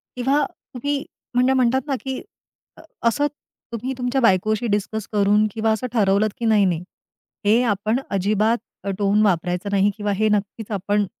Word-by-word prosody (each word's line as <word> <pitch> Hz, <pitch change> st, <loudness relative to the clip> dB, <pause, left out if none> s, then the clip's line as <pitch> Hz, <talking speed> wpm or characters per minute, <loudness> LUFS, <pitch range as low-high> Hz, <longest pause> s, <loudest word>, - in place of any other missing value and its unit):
किंवा 270 Hz, +4 st, +2 dB, 0.3 s
तुम्ही 280 Hz, +3 st, -2 dB, 0.3 s
म्हणजे 250 Hz, +2 st, +4 dB
म्हणतात 260 Hz, 0 st, +2 dB
ना, 275 Hz, -, 0 dB
की 265 Hz, -1 st, -4 dB, 0.6 s
अ, -, -, -13 dB, 0.3 s
असं 290 Hz, +6 st, +2 dB, 0.5 s
तुम्ही 250 Hz, +4 st, -3 dB
तुमच्या 250 Hz, +1 st, 0 dB
बायकोशी 215 Hz, +1 st, +2 dB
डिस्कस 210 Hz, +1 st, -2 dB
करून 210 Hz, +1 st, +3 dB
किंवा 220 Hz, 0 st, +1 dB
असं 220 Hz, +4 st, -1 dB
ठरवलंत, 205 Hz, -1 st, +3 dB
की 235 Hz, -, -2 dB
नाही 215 Hz, -3 st, +4 dB
नाही 175 Hz, -2 st, 0 dB, 0.6 s
हे 220 Hz, +4 st, +5 dB
आपण 215 Hz, +5 st, -1 dB
अजिबात 210 Hz, +4 st, +1 dB, 0.3 s
अ, 200 Hz, -, -3 dB
टोन 205 Hz, +1 st, +2 dB
वापरायचं 180 Hz, +1 st, 0 dB
नाही 200 Hz, 0 st, +3 dB
किंवा 205 Hz, -1 st, -1 dB
हे 215 Hz, +2 st, +1 dB
नक्कीच 210 Hz, +1 st, -2 dB
आपण, 205 Hz, +1 st, 0 dB
215 Hz, 160 wpm, -22 LUFS, 200-245 Hz, 0.6 s, हे